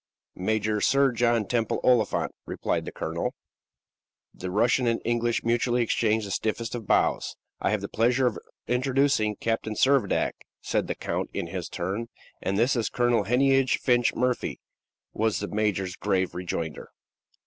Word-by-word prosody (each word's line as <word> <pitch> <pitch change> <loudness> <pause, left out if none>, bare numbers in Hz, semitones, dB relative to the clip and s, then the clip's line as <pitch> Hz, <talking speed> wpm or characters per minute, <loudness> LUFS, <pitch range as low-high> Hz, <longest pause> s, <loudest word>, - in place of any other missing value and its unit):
"Major 105 +2 0
Sir 135 +2 +4
John 120 -2 +2
Temple 115 +1 0
Oliphant," 120 -5 +2 0.2
replied - - -2
the - - -5
colonel. - - -3 1.0
The 90 - -6
Russian 120 +5 +2
and 115 0 +1
the - - -26
Englishman 120 -1 0
mutually 120 +1 +2
exchanged 110 -1 +1
the 100 - -6
stiffest 110 +3 -2
of 115 -4 -5
bows. - - +1 0.2
"I - - 0
have 105 0 0
the 100 - -4
pleasure 120 +5 +2
of 120 - 0 0.3
introducing 125 -3 +2
Captain 115 0 -2
Servadac," 130 -4 +2 0.3
said - - -1
the - - -2
count - - -3
in - - -2
his - - -5
turn. 95 +7 -3 0.3
"And 100 - -1
this 120 +6 +3
is 115 -3 0
Colonel 120 -4 +2
Heneage 135 +3 +3
Finch 120 -2 +2
Murphy," 125 0 -1 0.5
was 110 0 +1
the 105 - -4
major's 100 -3 -1
grave 95 -3 0
rejoinder. 85 -3 -4
115 Hz, 155 wpm, -26 LUFS, 105-125 Hz, 1.0 s, Sir